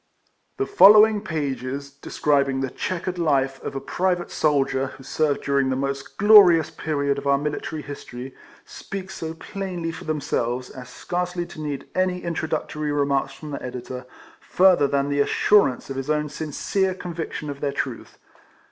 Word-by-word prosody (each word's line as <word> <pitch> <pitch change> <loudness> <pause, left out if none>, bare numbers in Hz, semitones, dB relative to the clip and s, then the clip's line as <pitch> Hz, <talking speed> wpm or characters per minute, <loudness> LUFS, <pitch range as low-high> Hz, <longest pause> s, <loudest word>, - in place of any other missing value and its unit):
The 405 - 0
following 215 - +7
pages, 140 - -4
describing 140 -1 0
the 135 -2 -2
che= 185 -3 -3
quered 180 -1 -3
life 135 -4 +1
of - - -6
a - - -1
private 175 +5 -1
soldier, 135 -3 +1
who 135 - -12
served 145 +1 0
during 140 -1 +1
the 130 - 0
most 135 0 -4
glorious 185 -7 +7
period 140 -3 -1
of 140 - -6
our 140 0 +4
military 150 +1 -4
history, 130 -2 -8 0.3
speak 190 -1 -7
so 160 0 -6
plainly 180 -2 -5
for - - -9
them 155 -1 -1
selves, 125 -1 -2
as 125 -1 -10
scarcely 180 +4 -3
to 155 - -10
need 145 -3 -4
any 185 -1 0
introductory 155 -2 -2
remarks 140 -2 0
from 150 +2 -9
the 140 - -5
editor, 125 0 -7 0.3
further 180 -6 +4
than 140 0 0
the 145 0 0
assurance 140 -3 +3
of 135 - -5
his 135 +2 -4
own 150 0 0
sincere 185 +6 -1
conviction 165 -4 -5
of 140 - -9
their 145 - 0
truth. - - -5
150 Hz, 165 wpm, -23 LUFS, 135-175 Hz, 0.3 s, following